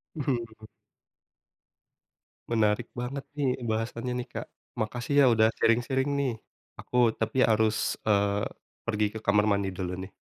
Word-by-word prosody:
Mhm. 115 -6 -3 1.8
Menarik 110 0 +1
banget 125 +3 -4
nih, 140 -3 +1 0.2
bahasannya 115 +2 -2
nih - - -19
Kak. - - -5 0.3
Makasih 120 +5 -2
ya 140 - +7
udah 110 0 +5
sharing-sharing 130 +4 +2
nih. 135 -3 +1 0.5
Aku 120 -2 +2
tapi 130 +3 +2
harus, 110 0 +2
eee, 100 -1 +2 0.4
pergi 105 -2 +1
ke 110 - -5
kamar 105 +1 +4
mandi 100 -1 +1
dulu 90 -1 -3
nih. 95 +1 -7
115 Hz, 130 wpm, -28 LUFS, 105-125 Hz, 1.8 s, ya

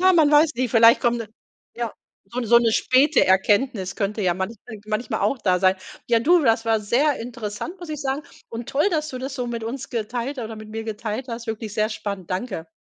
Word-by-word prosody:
Ja, 375 +1 +5
man 315 -4 +5
weiß 300 +1 +5
nicht, 250 -1 -1
vielleicht 230 +1 +6
kommt 240 -2 +1
'ne 230 -3 -6 0.5
ja, 235 -2 -3 0.3
so 235 +6 -4
so 235 +1 +6
'ne 230 -2 +2
späte 265 +6 +4
Erkenntnis 195 +1 +2
könnte 210 +1 -2
ja 180 -2 +2
manch 190 +5 -4 0.3
manchmal 215 +3 -2
auch 275 - +1
da 185 -5 +2
sein. 185 +1 +3 0.3
Ja, 230 -1 +4
du, 345 +8 +5
das 225 -3 +2
war 225 -1 +2
sehr 255 +8 +2
interessant, 235 - -6
muss 350 - -9
ich 305 -2 -5
sagen. 275 +1 -2 0.3
Und 235 +2 -7
toll, 290 +8 +2
dass 310 -3 -1
du 255 - -6
das 265 +1 -5
so 250 -3 -3
mit 235 -1 -4
uns 260 +4 -5
geteilt 240 +4 -3
ha 240 - -3
oder 220 0 -7
mit 215 0 -10
mir 225 +1 -5
geteilt 220 +2 -4
hast. 230 0 -6
Wirklich 220 -1 -5
sehr 215 0 +1
spannend. 200 -4 -5
Danke. 185 -4 -4
230 Hz, 225 wpm, -23 LUFS, 215-265 Hz, 0.5 s, vielleicht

